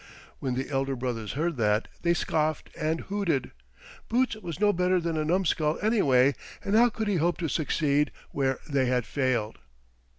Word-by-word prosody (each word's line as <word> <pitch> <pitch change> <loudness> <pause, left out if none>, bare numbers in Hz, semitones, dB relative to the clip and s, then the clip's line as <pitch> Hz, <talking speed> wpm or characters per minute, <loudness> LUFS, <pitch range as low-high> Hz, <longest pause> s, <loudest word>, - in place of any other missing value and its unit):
When 130 -2 -2
the 130 +3 -3
elder 135 0 0
brothers 120 -4 -3
heard 165 +1 -1
that 105 -1 +1
they 170 0 +2
scoffed 155 -2 -1
and 160 +1 -1
hooted. 185 -10 -1 0.6
Boots 245 0 +2
was 175 -6 -7
no 205 0 +4
better 180 +1 +2
than 165 -1 -2
a 155 - 0
numskull 160 -2 +1
anyway, 140 - +3 0.3
and 200 - -1
how 240 +2 +6
could 220 -1 -3
he 200 -3 +1
hope 170 +2 +1
to 170 - -2
succeed 150 0 +1 0.2
where 135 -1 0
they 140 -4 +1
had 125 -2 +1
failed. 125 -6 -1
155 Hz, 170 wpm, -27 LUFS, 130-180 Hz, 0.6 s, how